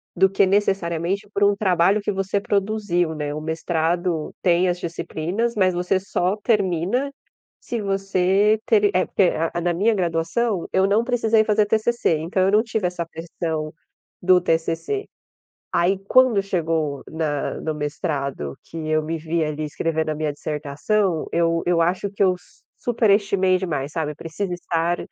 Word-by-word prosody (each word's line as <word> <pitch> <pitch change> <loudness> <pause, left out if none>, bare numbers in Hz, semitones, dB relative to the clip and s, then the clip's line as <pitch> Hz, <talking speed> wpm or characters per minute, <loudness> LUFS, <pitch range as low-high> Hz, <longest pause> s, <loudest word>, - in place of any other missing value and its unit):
do 190 +2 +5
que 195 0 +2
necessariamente 195 -1 0
por 205 - 0
um 200 0 +4
trabalho 195 0 +2
que 200 - -1
você 195 +1 -1
produziu, 200 -5 0
né. 150 -2 -3
O - - -3
mestrado 165 +1 -1
tem 180 0 +3
as 175 0 -1
disciplinas, 175 +5 -2
mas 190 -3 +3
você 180 +2 +1
só 190 0 -1
termina 210 - 0 0.5
se 235 - -4
você 195 +1 +2
ter 210 -2 +4
é, 185 - +3
porque 185 -3 +2 0.2
a 175 - -2
na 175 +1 +1
minha 205 +7 +2
graduação, 180 +3 -1
eu 190 +1 +3
não 210 +3 +3
precisei 230 -3 +2
fazer 215 -1 +2
TCC, 220 -5 +1
então 165 +5 -1
eu 190 - +3
não 210 +2 +4
tive 220 -5 -1
essa 175 -1 -4
pressão 160 -1 -4 0.5
do 180 0 +5
TCC. 165 - -1 0.7
Aí 180 +3 +2
quando 255 -5 +5
chegou 160 -7 -1
na 155 -3 -2
no 155 - -2
mestrado, 145 - -3
que - - -12
eu 155 0 +2
me 160 +2 -3
vi 160 +1 -1
ali 155 0 -3
escrevendo 160 +1 -1
a - - -1
minha 155 -1 -2
dissertação, 155 +6 -1
eu 165 0 +1
eu 175 -1 +2
acho 180 +4 +1
que 200 - -2
eu 185 -2 +4
su - - -25 0.3
superestimei 200 -4 +3
demais, 150 -7 -3
sabe. 150 -2 -2
Precisa 165 +5 -5
estar 170 0 -1
180 Hz, 160 wpm, -22 LUFS, 165-200 Hz, 0.7 s, do